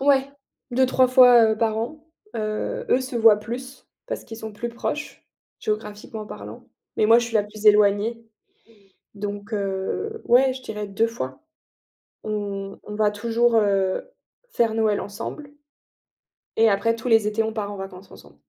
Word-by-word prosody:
Ouais, 275 0 +3 0.4
2-3 255 +1 +3
fois 245 -3 +7
par 220 -1 0
an. 295 +7 -4 0.3
Heu, 215 -1 -3
eux 255 - +3
se 260 0 -6
voient 225 -2 +6
plus, 250 +5 -8 0.2
parce - - -5
qu'ils 225 - -9
sont 220 -1 -7
plus 235 +3 -4
proches, 265 +6 -5 0.4
géographiquement 210 0 -4
parlant, - - -10 0.3
mais 215 - +3
moi 230 +2 +7
je 240 - -3
suis 230 - -8
la 205 - +3
plus 210 +1 -11
éloignée, 210 +2 +4 1.0
donc 205 +1 -6
heu, 200 - -3
ouais 255 +2 +4
je 260 - -9
dirais 210 -4 -5
2 200 +3 +1
fois. 180 - -6 0.8
On 200 -2 -4
on 210 - -7
va 210 -1 +2
toujours, 230 +3 +1
heu, 195 -3 +2 0.5
faire 230 - +1
Noël 220 -2 +1
ensemble 230 +9 -7 1.1
et 225 0 +5
après 230 +3 +1
tous 230 - -9
les 225 -2 +4
étés, 215 +1 0
on 220 - -2
part 210 -2 -4
en - - -7
vacances 195 0 -9
ensemble. 70 0 -15
220 Hz, 160 wpm, -23 LUFS, 205-240 Hz, 1.1 s, fois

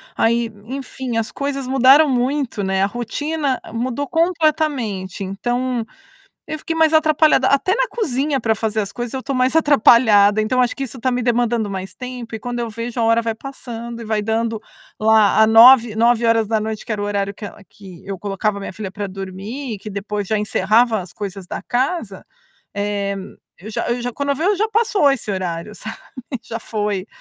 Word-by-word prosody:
Aí, 230 0 +1
enfim, 260 -1 -5
as 225 - -1
coisas 275 -2 -3
mudaram 270 +3 +6
muito, 255 -3 -1
né. 190 0 +1
A - - +4
rotina 270 +6 -2
mudou 255 +4 -2
completamente. 305 - 0
Então, 240 +5 -2 0.6
eu 310 - -4
fiquei 325 - -4
mais 320 0 +4
atrapalhada. 310 -3 +4
Até 280 +8 +2
na - - +2
cozinha 285 - -1
pra 225 -1 +1
fazer 220 0 -1
as 200 - -3
coisas, 240 0 -5
eu 260 - -3
tô 275 - -3
mais 255 +2 +1
atrapalhada. 220 -8 +5
Então, 255 +4 +1
acho 250 0 +1
que 275 - -4
isso 265 0 -6
tá 255 +2 +1
me 245 0 -1
demandando 235 -3 +1
mais 190 0 -6
tempo 250 -3 -7
e 220 - -5
quando 245 +1 -4
eu 235 - -2
vejo 230 +2 -6
a 230 - +2
hora 230 +1 +3
vai 225 -1 -2
passando 235 -3 -8
e - - -7
vai 215 -1 0
dando 225 +1 -1 0.4
lá 220 0 +5
nove 230 0 +7
nove 235 +1 +3
horas 225 -1 +3
da 220 0 +1
noite 215 0 -4
que - - -12
era 210 - -3
o 205 - -1
horário 200 -1 -1
que 205 - -10
ela 205 - -9
que 190 -4 -14
eu 195 -1 -5
colocava 200 +1 -2
minha 195 - -6
filha 200 -1 -6
pra 200 +1 -5
dormir 195 +7 -6
e - - -8
que 210 - -9
depois 205 0 -4
já 215 - 0
encerrava 215 +2 +2
as 180 -1 -10
coisas 195 -2 -7
da - - -6
casa. 245 - -2 0.5
Eh, 200 -1 -2 0.4
eu 210 +5 -10
já - - -3
eu 240 +1 0
já 245 +1 -3
quando 280 0 -3
eu 280 - +2
vejo 370 +8 +1
já 435 +3 0
passou 420 -9 +3
esse 235 -6 -3
horário, 185 +1 -4
sabe, 220 +1 -8 0.5
já 230 0 -6
foi. 210 -3 -3
230 Hz, 200 wpm, -20 LUFS, 210-265 Hz, 0.6 s, nove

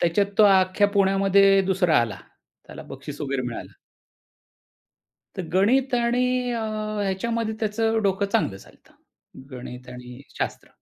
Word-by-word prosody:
त्याच्यात 175 +4 +2
तो 215 - +8
अख्ख्या 190 0 +4
पुण्यामध्ये 195 0 +4
दुसरा 180 -5 +2
आला, 110 -4 -3 0.5
त्याला - - -10
बक्षीस 145 -1 -9
वगैरे 140 -3 -2
मिळालं. 115 - -8 1.6
तर 190 - -3
गणित 250 +8 +2
आणि 250 +1 0
अ, 235 - -2 0.4
ह्याच्यामध्ये 220 +3 -2
त्याचं 225 +1 0
डोकं 200 0 0
चांगलं 200 - 0
चालत. - - -19 0.6
गणित 125 -1 -9
आणि 125 0 -10 0.2
शास्त्र. - - -4
195 Hz, 120 wpm, -24 LUFS, 155-225 Hz, 1.6 s, तो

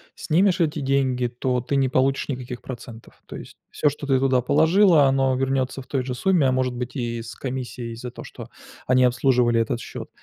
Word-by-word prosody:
снимешь 180 +3 +1
эти 155 -2 0
деньги, 135 -2 0
то 125 +1 -2
ты 135 +3 -3
не 135 -1 +2
получишь 135 +2 0
никаких 125 -2 -5
процентов. 120 -2 -10
То - - -10
есть - - -11
всё, 150 - +1
что 145 0 -7
ты 135 -2 +2
туда 130 -1 +2
положила, 160 - +4
оно 135 -1 +2
вернётся 135 0 -1
в 130 - -16
той 135 -3 -1
же 125 0 -4
сумме, 180 +2 +2
а - - +2
может 130 -1 -1
быть, 125 0 -5
и 120 -2 -3
с 115 - -9
комиссией 125 -3 -5
за 120 +1 -7
то, - - -10
что - - -11 0.4
они 130 0 +3
обслуживали 125 -2 +2
этот 115 +1 -1
счёт. - - -8
130 Hz, 205 wpm, -23 LUFS, 125-140 Hz, 0.4 s, положила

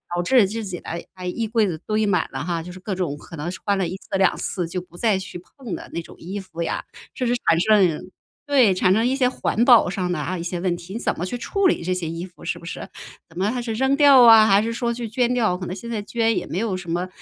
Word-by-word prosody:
导 175 - +1
致 235 +1 +4
自 225 +3 -4
己 180 -3 -5
的， - - -10 0.2
哎， 185 -1 -7
衣 225 +5 -2
柜 220 -1 +2
子 170 -4 -3
堆 215 0 +1
满 200 -3 +1
了 - - -4
哈， 170 -2 -2
就 180 - -9
是 185 - -10
各 195 +1 -4
种， 170 -6 -2
可 165 - -11
能 155 +2 -4
是 180 - -8
穿 200 -1 +2
了 190 -2 0
1 185 +3 -5
次 195 0 -4
2 190 -1 +3
次 180 -4 -3
就 180 +2 -4
不 175 -1 -19
再 215 -1 +2
去 185 -2 -8 0.2
碰 245 -8 -5
的 - - -10
那 170 - -2
种 - - -14
衣 190 +4 -5
服 185 -3 -8
呀。 170 - -2 0.3
甚 250 - -2
至 240 - +2
产 165 - +4
生 185 -5 +2 0.4
对， 260 -9 +5
产 185 0 +2
生 220 +3 +2
一 255 +2 +1
些 255 -2 +2
环 235 -2 0
保 240 -3 +7
上 180 -1 -2
的 175 - -1
啊 150 +5 -3
一 - - -5
些 175 0 -3
问 175 -1 0
题， 175 +2 -10
你 230 - -4
怎 - - -1
么 170 - -5
去 215 +7 -4
处 380 +11 +1
理 345 - 0
这 185 +2 0
些 180 -3 -3
衣 165 +2 -5
服 180 -2 -16
是 - - -3
不 170 - -13
是？ - - -6 0.4
怎 165 0 -16
么 195 +4 +1
还 250 0 -3
是 235 -2 -3
扔 265 +4 +2
掉 280 -3 +7
啊， 225 -2 +8
还 200 0 +4
是 230 +1 -2
说 235 0 -1
去 235 0 -4
捐 240 +2 0
掉， 220 -7 +2
可 180 -1 -6
能 180 - -4
现 220 +4 -9
在 220 -2 -2
捐 225 +1 0
也 180 - -3
没 - - -4
有 210 -1 -1
什 185 -2 -7
么 175 +2 -1
195 Hz, 310 characters per minute, -22 LUFS, 180-230 Hz, 0.4 s, 啊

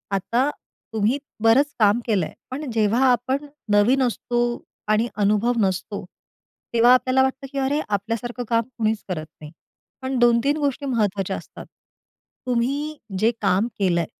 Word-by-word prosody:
आता 240 +8 +1 0.4
तुम्ही 220 +4 +1 0.3
बरंच 275 +6 +4
काम 210 +1 +4
केलंय, 200 -8 0 0.2
पण 280 +2 -4
जेव्हा 225 +3 +2
आपण 260 +4 0 0.3
नवीन 230 +6 +4
असतो 240 0 -1 0.5
आणि 215 +2 +2
अनुभव 210 +3 +2
नसतो 195 +1 -1 0.7
तेव्हा 235 +1 +6
आपल्याला 255 +1 +3
वाटतं, 265 +1 -2
की 280 - -6
अरे 275 +2 +1
आपल्या 205 +3 -1
सारखं 240 +2 -5
काम 230 -1 +3
कोणीच 220 -1 0
करत 160 -4 -3 0.2
नाही. 150 -1 -9 0.5
पण 260 0 -2
2-3 240 +5 +3
गोष्टी 285 -1 -1
महत्त्वाच्या 205 -6 0
असतात. - - -11 0.8
तुम्ही 275 +5 -1 0.2
जे 225 +3 +4
काम 195 +5 +2
केलंय, 175 -4 +2
235 Hz, 140 wpm, -23 LUFS, 210-265 Hz, 0.8 s, तेव्हा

